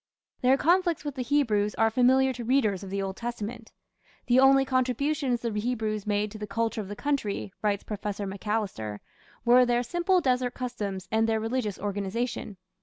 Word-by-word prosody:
Their 255 +2 +4
conflicts 345 0 +2
with 290 - -3
the 260 - -4
Hebrews 230 -6 +1
are 225 0 +3
familiar 260 +2 +4
to 245 -1 -6
readers 225 -6 +2
of 195 - -7
the 195 0 -2
Old 190 -1 -4
Testament. 235 -1 -5 0.5
"The 245 +1 +4
only 270 0 +6
contributions 260 0 0
the 235 - -2
Hebrews 215 -1 -2
made 205 0 0
to 215 - -9
the 210 - -5
culture 225 +2 -1
of 200 - -8
the 205 - -6
country", 215 -8 -2
writes 205 -2 0
Professor 205 -1 -4
Macalister, 195 - -3 0.5
"were 245 +1 +7
their 245 0 +1
simple 350 +8 +1
desert 250 -4 0
customs 205 -7 -4
and 225 +1 +2
their 220 0 +1
religious 225 -2 -2
organization. 205 +1 -3
230 Hz, 175 wpm, -27 LUFS, 205-255 Hz, 0.5 s, were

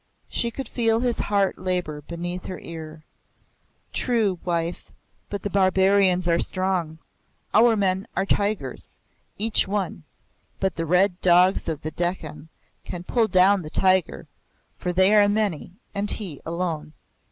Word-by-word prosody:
She 235 - -1
could 265 +1 -6
feel 225 -1 +1
his 245 -2 -1
heart 200 -2 0
labor 180 -5 -2
beneath 175 +3 -6
her 185 - -5
ear. 160 -1 -9 0.9
"True, 220 -7 0
wife; 170 -1 -3 0.4
but 200 - -5
the 205 - -2
barbarians 190 -1 +3
are 170 0 +3
strong. 185 -4 -1 0.6
Our 225 +1 +5
men 195 0 0
are 190 - 0
tigers, 200 -9 -2 0.4
each 215 0 +3
one, 195 -3 -2 0.6
but 190 -1 -1
the 165 -1 -3
red 180 +2 +2
dogs 180 0 +4
of 155 -2 -4
the 155 - -3
Dekkan 160 -3 -4 0.4
can 175 -1 -7
pull 225 +4 +1
down 190 +1 +4
the 155 - -8
tiger, 185 - +1 0.5
for 180 - -3
they 185 +3 +4
are 205 -1 +6
many, 205 -5 -1 0.2
and 205 0 0
he 180 -10 0
alone." 165 -3 -3
185 Hz, 140 wpm, -24 LUFS, 170-205 Hz, 0.9 s, are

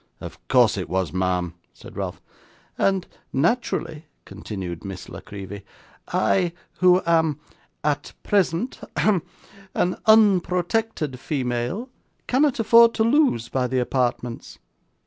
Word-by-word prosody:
'Of - - -9
course - - +4
it - - -5
was, 95 -4 -1
ma'am,' 90 -1 0 0.2
said - - -13
Ralph. - - -4 0.6
'And 195 -2 +1 0.3
naturally,' 160 - -1 0.2
continued 95 -4 -7
Miss 95 -1 -7
La - - -8
Creevy, 100 0 -9 0.4
'I 175 -3 +1 0.3
who 180 0 +5
am, 160 -3 +2 0.4
AT 145 -1 -1
PRESENT 195 +3 0 0.2
hem 200 -5 +3 0.5
an 180 - +1
unprotected 185 - +3
female, 130 - -2 0.4
cannot 270 0 +2
afford 230 +1 +6
to 220 - +2
lose 235 - +3
by 130 -1 -1
the 130 +1 -1
apartments. 125 -1 -2
160 Hz, 115 wpm, -23 LUFS, -, 0.6 s, afford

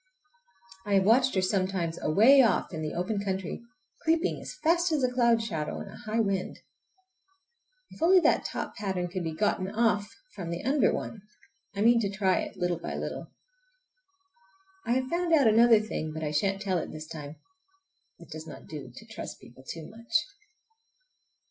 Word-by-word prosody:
I 205 -1 0
have 195 - +4
watched 250 +5 +4
her 190 - +2
sometimes 185 -3 -1
away 230 - +6
off 225 -6 +1
in 160 - -4
the 155 -1 -4
open 200 +3 -2
country, 190 -1 -3 0.4
creeping 330 +2 +1
as - - -8
fast 340 +1 +3
as 300 -4 +1
a 250 - +2
cloud 235 -2 +3
shadow 160 -9 -3
in - - -8
a - - -11
high 225 -1 -3
wind. 195 -4 -1 1.3
If - - -14
only 365 +3 +6
that - - +3
top - - -5
pattern 190 -4 -2
could 185 0 -4
be 160 -1 -4
gotten 190 0 0
off 215 -1 +1 0.2
from 170 - -6
the 170 0 -4
under 275 +3 +3
one! 215 - -5 0.5
I 200 - -2
mean 235 +2 +5
to 205 -3 0
try 195 -1 +1
it, - - -6
little 175 -1 -1
by - - -5
little. - - -5 1.6
I 235 - +2
have 260 +1 0
found 340 -1 +2
out 285 -4 +4
another 225 +1 +6
funny 215 0 -3
thing, 155 0 -3
but 160 0 -5
I 150 - -2
shan't 195 +6 0
tell 185 -3 0
it - - -6
this 155 0 -7
time! 150 -2 -8 0.8
It - - -15
does 155 +1 -8
not - - -10
do 145 -5 -8
to 125 - -13
trust 225 -4 -8
people 125 +2 -16
too 165 -2 -8
much. 230 +2 -15
200 Hz, 185 wpm, -28 LUFS, 170-235 Hz, 1.6 s, away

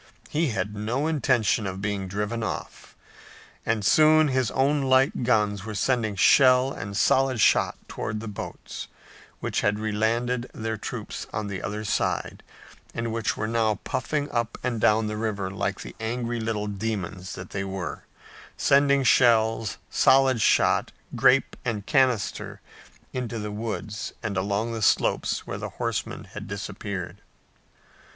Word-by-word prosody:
He 160 +2 +1
had 105 -4 -2
no 115 +8 -1
intention 125 -9 +1
of 95 0 -5
being 100 -1 -2
driven 105 +4 -3
off, 110 - -6 0.7
and 110 -3 0
soon 155 +4 +5
his 130 -4 +1
own 140 +2 +2
light 130 0 +3
guns 105 -5 +1
were 105 0 -6
sending 110 0 0
shell 125 +6 +5
and 100 +1 -5
solid 130 +1 +3
shot - - +3
toward 105 0 -4
the 110 - -7
boats, 105 - -7 0.5
which - - -1
had 105 0 +1
relanded 115 +4 0
their 110 0 -3
troops - - -6
on 105 0 -3
the 100 -2 -4
other 105 +1 -4
side, 100 -4 -1 0.5
and 115 -1 -2
which 115 -1 -1
were 110 - -1
now 110 -1 +1
puffing 145 +3 -2
up 115 -1 -1
and 120 -3 -1
down 105 +3 +4
the 105 0 -3
river 105 -4 -2
like 100 - -2
the - - -9
angry 120 +1 -2
little 110 -2 -2
demons 100 -3 -4
they 95 +2 -5
were, 95 -2 -5 0.5
sending 140 0 +4
shells, 115 -4 +3
solid 130 -3 +4
shot, - - +3 0.2
grape 130 +2 +4
and 110 -5 -3
canister 130 -7 +1 0.5
into 125 -2 -3
the 105 -1 -4
woods 105 0 -4
and 110 -3 -2
along 100 +4 -1
the 115 - -4
slopes - - +1
where - - -5
the - - -4
horsemen - - -3
had - - -9
disappeared. 100 -2 -5
110 Hz, 145 wpm, -26 LUFS, 105-125 Hz, 0.7 s, soon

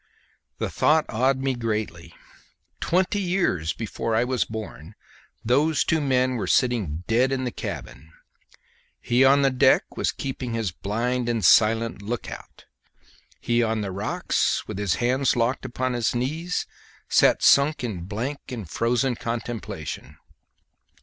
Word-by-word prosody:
The - - -3
thought 155 0 +3
awed 130 +4 +2
me 135 0 -1
greatly: 105 -8 -4 0.6
twenty 185 +3 +1
years 175 - 0
before 115 +1 -3
I 115 - +3
was 125 -1 0
born 110 -5 -8 0.5
those 145 +5 +2
two 160 -1 +1
men 130 -2 +1
were - - -3
sitting 110 - +1
dead 125 +4 +2
in 130 -1 -1
the 125 - -2
cabin! 75 - -7 0.9
he 120 +2 +2
on 140 +1 +5 0.2
deck - - +5
was - - 0
keeping 130 -3 -5
his 110 -5 -1
blind 120 +6 -2
and 115 -5 0
silent 110 +2 +4
look 115 +3 -4
out; - - -11 0.7
he 120 0 +1
on 110 -1 0
the 100 -2 -3
rocks 100 +3 -1
with - - -5
his 100 -5 +1
hands 130 +2 +1
locked 120 +3 0
upon 130 0 -2
his 120 0 0
knees 155 +9 -2 0.4
sat - - +4
sunk 140 0 +4
in 95 -8 -4
blank 120 +9 -4
and 110 -11 -7
frozen 125 +3 +1
contemplation! 115 - -5
120 Hz, 140 wpm, -24 LUFS, 110-130 Hz, 0.9 s, on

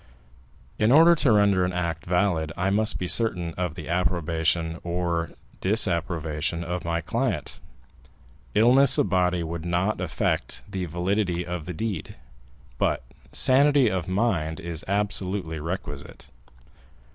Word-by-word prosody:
"In 110 +2 +3
order 165 +4 +7
to 150 -6 +3
render 100 -3 +4
an 90 0 -1
act 85 -2 -3
valid, 90 -4 +1
I 95 +2 0
must 110 +2 +2
be 90 - -3
certain 90 -5 +1
of 90 -2 -3
the 80 - -8
approbation 80 -1 0
or 85 -1 -2 0.3
disapprobation 85 -5 -1
of 90 +1 -4
my 85 0 -1
client. - - -2 1.0
Illness 125 +4 +5
of - - +1
body 90 -2 +1
would 80 0 -5
not 90 +4 -1
affect 90 - -2
the 95 -2 -4
validity 90 +1 -1
of 85 -3 -5
the 90 - -4
deed, 105 -3 -4 0.6
but - - 0 0.3
sanity 140 -1 +5
of 90 -3 -2
mind 95 -6 0
is 85 -2 -6
absolutely 95 -4 -2
requisite." 75 -3 -7
90 Hz, 130 wpm, -25 LUFS, 85-100 Hz, 1.0 s, order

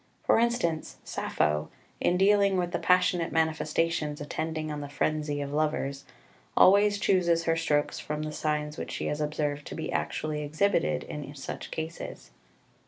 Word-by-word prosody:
For - - +4
instance, 230 -10 0
Sappho, 75 0 -1 0.3
in 180 - +2
dealing 200 0 +4
with 175 -1 0
the 175 - -1
passionate 180 -2 +3
manifestations 160 -1 0
attending 155 +1 -3
on 150 -1 -4
the 145 - -6
frenzy 150 0 -1
of 140 0 -4
lovers, 145 -2 -1 0.5
always 205 +2 +6
chooses 175 -4 +2
her 165 0 +2
strokes 150 -3 0
from 150 0 -4
the 155 - -3
signs 150 0 -2
which - - -5
she - - -4
has 150 +1 -2
observed 150 -1 -2
to - - -6
be - - -4
actually 150 -1 -2
exhibited 150 - +1
in 145 -1 -7
such 135 - -6
cases. 160 +1 -6
155 Hz, 155 wpm, -28 LUFS, 150-175 Hz, 0.5 s, always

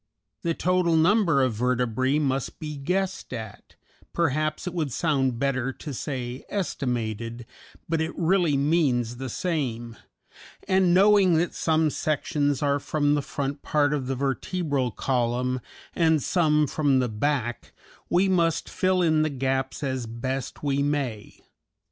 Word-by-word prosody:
The 165 -1 -1
total 180 -2 +2
number 165 -4 +4
of 130 -3 +1
vertebræ 125 +3 +1
must 135 -3 -2
be 150 -1 -5
guessed 185 +7 -2
at 110 -4 -8 0.4
(perhaps 155 -1 0
it 180 - -4
would 155 -6 -2
sound 135 -4 0
better 135 0 0
to 145 - -7
say 125 -1 -4
estimated, 120 - -3 0.4
but 165 -1 0
it 160 +1 -3
really 170 -4 +2
means 135 -6 +1
the 130 0 -5
same), 120 - -3 0.7
and 190 -2 +3
knowing 195 -1 +5
that 170 +2 +1
some 160 -1 +1
sections 145 -2 0
are 140 0 +2
from 145 0 +1
the 145 - +1
front 140 +1 -4
part 150 -1 +1
of 135 -4 -2
the 135 - -1
vertebral 140 0 -1
column 125 +1 -1 0.3
and 160 -3 +2
some 150 -4 +3
from 145 -1 +1
the 125 -1 +2
back, 120 +1 -2 0.4
we 185 +3 +3
must 170 -3 +1
fill 185 -1 +1
in 155 -2 +3
the 155 - +1
gaps 135 0 -2
as 130 -3 -2
best 130 +6 -4
we 140 -1 +1
may. 140 -7 -2
145 Hz, 140 wpm, -25 LUFS, 130-165 Hz, 0.7 s, knowing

